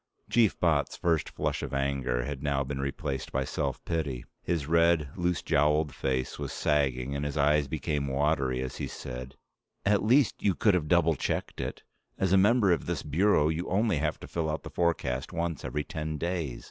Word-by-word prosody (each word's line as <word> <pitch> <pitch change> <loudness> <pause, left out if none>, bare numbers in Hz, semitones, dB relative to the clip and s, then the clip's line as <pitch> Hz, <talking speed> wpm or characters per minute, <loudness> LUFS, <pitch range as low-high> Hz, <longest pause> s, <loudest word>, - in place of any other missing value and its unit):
Chief 115 -4 +3
Botts' 80 -5 +1
first 85 -2 +1
flush - - -2
of - - -4
anger 70 -3 0
had 70 +1 -5
now 70 -2 0
been 70 0 -4
replaced 70 -1 -3
by 65 - 0
self 70 0 -3
pity. 70 -7 -2 0.2
His 85 -5 -1
red, 85 -1 +3
loose 90 -3 0
jowled 75 0 +2
face 65 -1 -2
was - - -4
sagging 70 -2 0
and 70 - -2
his 75 +1 -3
eyes 75 0 +3
became 70 +1 -2
watery 70 -2 +1
as 65 - -6
he - - -3
said, 65 +1 -7 0.5
"At 105 0 +3
least 125 +4 +3
you 95 -3 +2
could 105 - +3
have 85 -4 +1
double 85 0 +4
checked - - -3
it. - - -5 0.3
As 95 -1 +1
a - - +7
member 105 0 +4
of 85 - 0
this - - -2
Bureau 80 0 +3
you 80 +3 -2
only 105 -2 +2
have 75 +1 -1
to - - -8
fill 80 -2 -2
out 75 - -3
the - - -8
forecast 80 -7 -1
once 85 -5 -2
every 75 - -2
ten 75 +2 -4
days. 85 -6 -2
75 Hz, 195 wpm, -29 LUFS, 70-85 Hz, 0.5 s, a